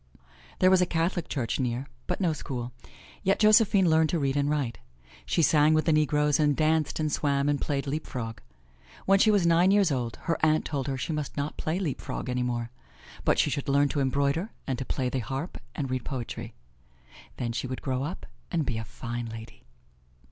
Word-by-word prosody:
There 185 Hz, 0 st, +5 dB
was 190 Hz, -1 st, +5 dB
a 180 Hz, -, +2 dB
Catholic 170 Hz, +1 st, -1 dB
church 120 Hz, -6 st, -2 dB
near, 125 Hz, 0 st, -1 dB, 0.2 s
but -, -, -2 dB
no 175 Hz, -5 st, +2 dB
school. 125 Hz, -4 st, -5 dB, 0.5 s
Yet 195 Hz, +2 st, +2 dB
Josephine 210 Hz, -3 st, +5 dB
learned 160 Hz, -1 st, +4 dB
to 175 Hz, -, 0 dB
read 140 Hz, -3 st, 0 dB
and 145 Hz, 0 st, +1 dB
write. 140 Hz, -6 st, -1 dB, 0.5 s
She 165 Hz, -, +2 dB
sang 155 Hz, 0 st, +5 dB
with 155 Hz, -, +2 dB
the 160 Hz, -, +3 dB
negroes 150 Hz, -1 st, +2 dB
and 145 Hz, -2 st, +3 dB
danced 155 Hz, -1 st, +1 dB
and 155 Hz, -1 st, 0 dB
swam 140 Hz, -1 st, +1 dB
and 145 Hz, -1 st, +1 dB
played 140 Hz, -1 st, -1 dB
leap 150 Hz, +3 st, -3 dB
frog. 115 Hz, -4 st, -5 dB, 0.6 s
When 195 Hz, 0 st, +5 dB
she 215 Hz, -, +5 dB
was 205 Hz, -4 st, +3 dB
nine 170 Hz, +2 st, +5 dB
years 200 Hz, -4 st, +4 dB
old, 120 Hz, -4 st, -2 dB
her 165 Hz, -, -1 dB
aunt 155 Hz, 0 st, +3 dB
told 140 Hz, -3 st, -3 dB
her 135 Hz, -1 st, -2 dB
she 160 Hz, -, -3 dB
must 150 Hz, -2 st, -4 dB
not 145 Hz, +1 st, -2 dB
play 160 Hz, +3 st, -2 dB
leap 165 Hz, -9 st, -2 dB
frog -, -, -5 dB
any 125 Hz, 0 st, 0 dB
more, 120 Hz, -1 st, -2 dB, 0.5 s
but -, -, +2 dB
she -, -, +2 dB
should 140 Hz, 0 st, -3 dB
learn 140 Hz, +1 st, +3 dB
to 145 Hz, -, -1 dB
embroider 140 Hz, -, +1 dB, 0.2 s
and 130 Hz, -2 st, -2 dB
to 130 Hz, -, -3 dB
play 130 Hz, 0 st, -1 dB
the 130 Hz, +1 st, -1 dB
harp 135 Hz, +9 st, -4 dB, 0.2 s
and 135 Hz, -5 st, -3 dB
read 130 Hz, -2 st, -2 dB
poetry. 125 Hz, -4 st, -5 dB, 0.8 s
Then 120 Hz, -1 st, -2 dB
she 125 Hz, +2 st, -3 dB
would 130 Hz, 0 st, -6 dB
grow 130 Hz, -2 st, -1 dB
up 155 Hz, +7 st, -5 dB, 0.2 s
and 165 Hz, -5 st, 0 dB
be 115 Hz, -4 st, -2 dB
a -, -, -4 dB
fine 120 Hz, +2 st, -5 dB
lady. 115 Hz, -, -10 dB
145 Hz, 210 wpm, -27 LUFS, 130-160 Hz, 0.8 s, There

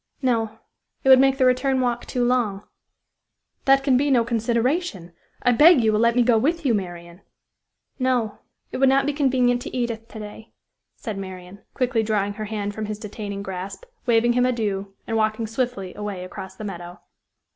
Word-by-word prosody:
"No; 230 Hz, -4 st, 0 dB, 0.5 s
it 265 Hz, -, +2 dB
would 260 Hz, -1 st, +9 dB
make 270 Hz, 0 st, +4 dB
the 260 Hz, -, +3 dB
return 255 Hz, +1 st, +2 dB
walk 240 Hz, -1 st, -1 dB
too 245 Hz, -1 st, 0 dB
long." 230 Hz, -5 st, 0 dB, 1.0 s
"That 270 Hz, 0 st, +5 dB
can 270 Hz, -3 st, +3 dB
be 285 Hz, +2 st, +1 dB
no 250 Hz, -4 st, +4 dB
consideration, 235 Hz, -, -1 dB, 0.3 s
I 245 Hz, -, +4 dB
beg 295 Hz, +2 st, +6 dB
you 220 Hz, -1 st, +3 dB
will 210 Hz, -, +2 dB
let 235 Hz, +1 st, +3 dB
me 245 Hz, -, +4 dB
go 235 Hz, -2 st, +4 dB
with 325 Hz, +6 st, 0 dB
you, 250 Hz, -, +3 dB
Marian." 175 Hz, -2 st, -5 dB, 0.8 s
"No; 245 Hz, -5 st, 0 dB, 0.3 s
it -, -, -4 dB
would 265 Hz, 0 st, +4 dB
not 270 Hz, +1 st, +3 dB
be 290 Hz, -, 0 dB
convenient 255 Hz, -4 st, +2 dB
to 255 Hz, -, -6 dB
Edith 230 Hz, -2 st, -3 dB
to -, -, -11 dB
day," 215 Hz, +1 st, -10 dB, 0.4 s
said 215 Hz, -4 st, -6 dB
Marian, 185 Hz, 0 st, -9 dB, 0.2 s
quickly 250 Hz, -3 st, +1 dB
drawing 210 Hz, -2 st, 0 dB
her 215 Hz, +1 st, -5 dB
hand 205 Hz, -1 st, -3 dB
from 215 Hz, 0 st, -4 dB
his 210 Hz, -1 st, -4 dB
detaining 205 Hz, -1 st, -6 dB
grasp, 190 Hz, -, -6 dB, 0.2 s
waving 240 Hz, 0 st, +4 dB
him 250 Hz, 0 st, +2 dB
adieu, 205 Hz, -6 st, -1 dB
and 225 Hz, -, -1 dB
walking 220 Hz, +1 st, 0 dB
swiftly 225 Hz, -5 st, -3 dB
away 205 Hz, -3 st, -5 dB
across 190 Hz, +1 st, -8 dB
the 215 Hz, -, -9 dB
meadow. 175 Hz, -3 st, -7 dB
225 Hz, 185 wpm, -23 LUFS, 205-255 Hz, 1.0 s, would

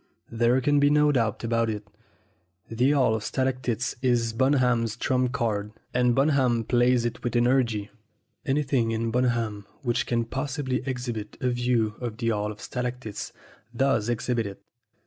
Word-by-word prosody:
There 120 Hz, +2 st, +3 dB
can 145 Hz, +2 st, +3 dB
be 145 Hz, 0 st, +4 dB
no 150 Hz, 0 st, +4 dB
doubt 115 Hz, -6 st, 0 dB
about 115 Hz, 0 st, +1 dB
it, 105 Hz, -1 st, -5 dB, 0.8 s
the 120 Hz, +4 st, +2 dB
Hall 135 Hz, -6 st, +3 dB
of 110 Hz, -, -1 dB
Stalac 130 Hz, +2 st, -1 dB
tites 120 Hz, 0 st, -2 dB
is 120 Hz, -3 st, +1 dB
Bunham's 125 Hz, -3 st, +2 dB
trump 125 Hz, 0 st, +1 dB
card, 110 Hz, -5 st, -2 dB, 0.2 s
and 125 Hz, -1 st, +3 dB
Bunham 135 Hz, -5 st, +2 dB
plays 120 Hz, +1 st, +2 dB
it 120 Hz, 0 st, -4 dB
with 120 Hz, -, -2 dB
energy. 120 Hz, -4 st, +2 dB, 0.5 s
Anything 135 Hz, -4 st, +1 dB
in 115 Hz, 0 st, -1 dB
Bunham 115 Hz, -4 st, 0 dB, 0.2 s
which 120 Hz, -2 st, 0 dB
can 115 Hz, -1 st, 0 dB
possibly 135 Hz, 0 st, -2 dB
exhibit 125 Hz, -5 st, -4 dB
a 125 Hz, -, 0 dB
view 120 Hz, -3 st, 0 dB
of 115 Hz, -3 st, -4 dB
the 115 Hz, -1 st, -1 dB
Hall 105 Hz, -1 st, -1 dB
of 105 Hz, -, -11 dB
Stalactites 125 Hz, -3 st, -4 dB, 0.4 s
does 125 Hz, -3 st, +1 dB
exhibit 120 Hz, -1 st, -1 dB
it. 100 Hz, 0 st, -10 dB
120 Hz, 155 wpm, -26 LUFS, 115-130 Hz, 0.8 s, be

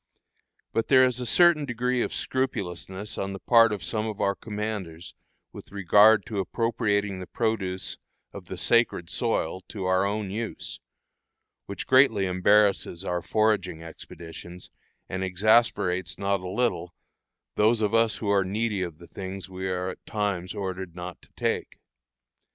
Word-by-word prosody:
But 115 Hz, -, 0 dB
there 130 Hz, -1 st, +6 dB
is 125 Hz, -1 st, -1 dB
a 125 Hz, -, -3 dB
certain 175 Hz, -1 st, +5 dB
degree 125 Hz, -1 st, -1 dB
of -, -, -1 dB
scrupulousness 100 Hz, -5 st, -3 dB
on 95 Hz, 0 st, -3 dB
the 95 Hz, -, -7 dB
part 115 Hz, 0 st, +5 dB
of 105 Hz, -, -4 dB
some 110 Hz, -1 st, -2 dB
of 105 Hz, -2 st, -5 dB
our 100 Hz, -, +2 dB
commanders 105 Hz, -6 st, -5 dB, 0.4 s
with -, -, -11 dB
regard 100 Hz, +2 st, +5 dB
to 110 Hz, -5 st, -4 dB
appropriating 105 Hz, -2 st, 0 dB
the 90 Hz, -, -7 dB
produce 95 Hz, -5 st, -2 dB, 0.3 s
of -, -, -9 dB
the -, -, -7 dB
"sacred 115 Hz, -7 st, +2 dB
soil" 95 Hz, -7 st, -1 dB
to 100 Hz, -4 st, -5 dB
our 95 Hz, 0 st, +2 dB
own 100 Hz, 0 st, -2 dB
use, 110 Hz, +2 st, -5 dB, 0.9 s
which 100 Hz, -, -5 dB
greatly 130 Hz, -7 st, +5 dB
embarrasses 95 Hz, -1 st, +2 dB
our 90 Hz, -1 st, -1 dB
foraging 95 Hz, -6 st, 0 dB
expeditions, 85 Hz, +1 st, -10 dB, 0.4 s
and 95 Hz, 0 st, -3 dB
exasperates 95 Hz, -2 st, +2 dB
not 100 Hz, 0 st, 0 dB
a 90 Hz, 0 st, -6 dB
little 90 Hz, -5 st, -1 dB, 0.6 s
those 110 Hz, +2 st, +3 dB
of 105 Hz, 0 st, 0 dB
us 115 Hz, -1 st, +3 dB
who 105 Hz, -, -4 dB
are 100 Hz, -1 st, +3 dB
needy 105 Hz, +1 st, -1 dB
of 85 Hz, -4 st, -4 dB
the 85 Hz, -, -13 dB
things 95 Hz, 0 st, -7 dB
we 95 Hz, 0 st, -4 dB
are 90 Hz, 0 st, -2 dB
at 95 Hz, -, -9 dB
times 100 Hz, -3 st, -2 dB
ordered 95 Hz, -3 st, -5 dB
not 90 Hz, 0 st, -7 dB
to -, -, -22 dB
take. -, -, -2 dB
100 Hz, 155 wpm, -26 LUFS, 95-110 Hz, 0.9 s, there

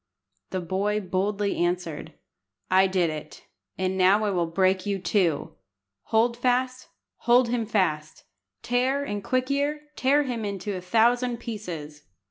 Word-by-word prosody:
The 185 Hz, -, -3 dB
boy 195 Hz, +4 st, -1 dB
boldly 200 Hz, +1 st, -1 dB
answered 175 Hz, -3 st, -3 dB, 0.6 s
"I 190 Hz, +1 st, +5 dB
did 180 Hz, -3 st, +1 dB
it, 155 Hz, -1 st, -8 dB, 0.3 s
and 185 Hz, 0 st, -1 dB
now 195 Hz, +4 st, +5 dB
I 205 Hz, -, +1 dB
will 175 Hz, -3 st, 0 dB
break 185 Hz, +2 st, +1 dB
you 200 Hz, -1 st, -1 dB
too. 180 Hz, -5 st, 0 dB, 0.5 s
Hold 230 Hz, +2 st, +2 dB
fast, 255 Hz, +1 st, 0 dB, 0.3 s
hold 240 Hz, 0 st, +3 dB
him 235 Hz, -2 st, -1 dB
fast; 155 Hz, -8 st, -1 dB, 0.4 s
Tear 255 Hz, +3 st, +1 dB
and 205 Hz, -7 st, -4 dB
Quick 255 Hz, +3 st, 0 dB
ear, 295 Hz, +2 st, -1 dB
tear 280 Hz, +3 st, +3 dB
him 245 Hz, -5 st, -3 dB
into 200 Hz, 0 st, -4 dB
a 180 Hz, -, -5 dB
thousand 235 Hz, +5 st, +2 dB
pieces!" 175 Hz, -11 st, -7 dB
205 Hz, 140 wpm, -26 LUFS, 185-245 Hz, 0.6 s, I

